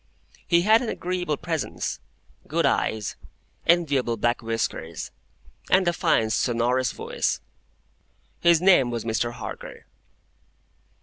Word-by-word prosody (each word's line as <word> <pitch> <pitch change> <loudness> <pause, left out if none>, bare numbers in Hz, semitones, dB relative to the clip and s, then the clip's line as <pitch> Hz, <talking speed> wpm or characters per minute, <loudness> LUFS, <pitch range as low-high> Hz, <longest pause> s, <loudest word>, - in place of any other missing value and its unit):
He 170 -1 +4
had 220 +3 +5
an 240 - -3
agreeable 175 -4 -2
presence, 160 - -3 0.5
good - - +1
eyes, 110 -2 0 0.5
enviable 145 -9 +2
black 120 +4 0
whiskers, 115 -7 -3 0.6
and 185 -1 +4
a 175 - +3
fine 110 -8 +2
sonorous 120 +2 +1
voice. - - -2 1.0
His 170 -1 +4
name 180 -10 +5
was 120 -2 -4
Mr. 115 +1 -1
Harker. 125 - -8
130 Hz, 110 wpm, -25 LUFS, 115-175 Hz, 1.0 s, had